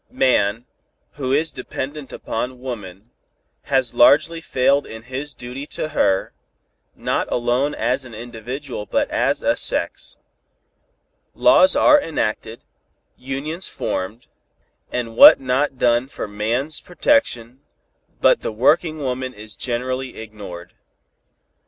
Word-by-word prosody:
Man, 120 Hz, -, +1 dB, 0.5 s
who 130 Hz, -3 st, -4 dB
is 155 Hz, +4 st, +1 dB
so -, -, -17 dB
dependent 135 Hz, +2 st, -6 dB
upon 125 Hz, +2 st, -4 dB
woman, 110 Hz, -4 st, -8 dB, 0.5 s
has 130 Hz, -4 st, +1 dB
largely 150 Hz, +7 st, +4 dB
failed 140 Hz, -1 st, +1 dB
in 110 Hz, 0 st, -9 dB
his 130 Hz, +3 st, -6 dB
duty 125 Hz, +4 st, -8 dB
to 155 Hz, -, -2 dB
her, 95 Hz, -10 st, +1 dB, 0.6 s
not -, -, -2 dB
alone 125 Hz, +4 st, 0 dB
as 130 Hz, +3 st, 0 dB
an 120 Hz, -3 st, -11 dB
individual 120 Hz, +1 st, -7 dB
but -, -, 0 dB
as -, -, 0 dB
a -, -, +2 dB
sex. -, -, -2 dB, 1.2 s
Laws 185 Hz, +1 st, +5 dB
are 300 Hz, -1 st, +6 dB
enacted, 115 Hz, -, -3 dB, 0.5 s
unions 140 Hz, +7 st, -5 dB
formed, 105 Hz, +6 st, -4 dB, 0.7 s
and 115 Hz, -2 st, -3 dB
what -, -, +10 dB
not 135 Hz, +1 st, 0 dB
done 120 Hz, +1 st, +2 dB
for 135 Hz, -, -6 dB
man's 115 Hz, +9 st, -2 dB
protection, 155 Hz, -, 0 dB, 0.6 s
but -, -, +4 dB
the -, -, -3 dB
working 155 Hz, +8 st, +2 dB
woman 130 Hz, -2 st, -3 dB
is 105 Hz, 0 st, -10 dB
generally 130 Hz, +1 st, -3 dB
ignored. 100 Hz, -5 st, -9 dB
125 Hz, 120 wpm, -21 LUFS, 115-140 Hz, 1.2 s, what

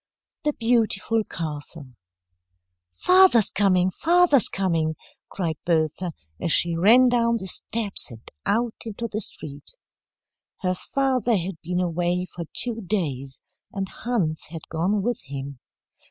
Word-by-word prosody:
THE 300 Hz, -1 st, +1 dB
BEAUTIFUL 225 Hz, -2 st, +1 dB
CASTLE 150 Hz, -3 st, -6 dB, 1.0 s
"FATHER'S 360 Hz, -, +5 dB
coming, 185 Hz, -2 st, +3 dB
father's 335 Hz, -, +4 dB
coming," 165 Hz, -5 st, 0 dB, 0.3 s
cried 165 Hz, -5 st, -3 dB
Bertha, 165 Hz, +1 st, 0 dB, 0.3 s
as 170 Hz, -, 0 dB
she 170 Hz, +1 st, +3 dB
ran 225 Hz, +9 st, +6 dB
down 235 Hz, -1 st, +2 dB
the 190 Hz, -, -6 dB
steps 205 Hz, 0 st, +1 dB
and 115 Hz, -2 st, -13 dB, 0.2 s
out 230 Hz, +2 st, +1 dB
into 230 Hz, +1 st, -5 dB
the 215 Hz, 0 st, -4 dB
street. 145 Hz, -, -6 dB, 0.9 s
Her 185 Hz, -1 st, +1 dB
father 250 Hz, +1 st, 0 dB
had 180 Hz, -1 st, -4 dB
been 180 Hz, +2 st, -2 dB
away 175 Hz, +1 st, 0 dB
for 170 Hz, -1 st, -6 dB
two 230 Hz, -2 st, 0 dB
days, 140 Hz, -9 st, -2 dB, 0.3 s
and 195 Hz, -1 st, -3 dB
Hans 195 Hz, -10 st, -2 dB
had 165 Hz, -1 st, -8 dB
gone 185 Hz, +5 st, 0 dB
with 240 Hz, +2 st, -1 dB
him. 140 Hz, -1 st, -7 dB
185 Hz, 125 wpm, -24 LUFS, 165-230 Hz, 1.0 s, ran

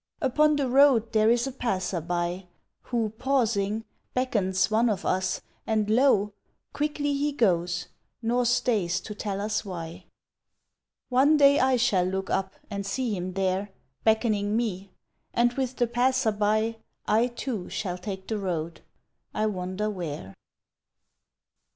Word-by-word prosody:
Upon 300 Hz, +2 st, +3 dB
the 280 Hz, -2 st, 0 dB
road 255 Hz, -3 st, +5 dB
there 215 Hz, 0 st, +4 dB
is 240 Hz, +1 st, +3 dB
a 270 Hz, -, -3 dB
Passer 195 Hz, -8 st, -2 dB
By 175 Hz, +2 st, -2 dB, 0.4 s
Who, 230 Hz, -3 st, -1 dB
pausing, 225 Hz, -5 st, 0 dB, 0.3 s
beckons 200 Hz, -6 st, +1 dB
one 230 Hz, +2 st, +3 dB
of 205 Hz, -, -2 dB
us 185 Hz, 0 st, 0 dB, 0.3 s
and 215 Hz, -1 st, +1 dB
lo! 215 Hz, -4 st, +3 dB, 0.4 s
Quickly 290 Hz, -1 st, -1 dB
he 285 Hz, +1 st, 0 dB
goes, 180 Hz, -, +1 dB, 0.3 s
nor 240 Hz, +1 st, +1 dB
stays 230 Hz, -7 st, +1 dB
to 210 Hz, -, -7 dB
tell 205 Hz, -1 st, -4 dB
us 210 Hz, +1 st, -1 dB
why. 170 Hz, -5 st, -7 dB, 1.0 s
One 275 Hz, +5 st, +4 dB
day 280 Hz, 0 st, +6 dB
I 260 Hz, 0 st, +3 dB
shall 225 Hz, -7 st, +2 dB
look 190 Hz, +1 st, -3 dB
up 190 Hz, 0 st, -1 dB
and 200 Hz, -2 st, -4 dB
see 225 Hz, +2 st, -2 dB
him 180 Hz, 0 st, -4 dB
there 190 Hz, +1 st, 0 dB, 0.3 s
Beckoning 220 Hz, -2 st, +2 dB
me, 200 Hz, -5 st, -2 dB, 0.5 s
and 240 Hz, +1 st, +3 dB
with 260 Hz, -1 st, -2 dB
the 240 Hz, -, +2 dB
Passer 245 Hz, 0 st, +2 dB
By 215 Hz, +2 st, +1 dB, 0.3 s
I, 225 Hz, +3 st, +3 dB
too, 240 Hz, -5 st, -5 dB
shall 180 Hz, -3 st, -3 dB
take 190 Hz, 0 st, -6 dB
the 220 Hz, -2 st, -2 dB
road 170 Hz, -4 st, -3 dB, 0.5 s
I 215 Hz, -, +1 dB
wonder 190 Hz, 0 st, -2 dB
where? 155 Hz, -, -5 dB
215 Hz, 140 wpm, -27 LUFS, 190-245 Hz, 1.0 s, day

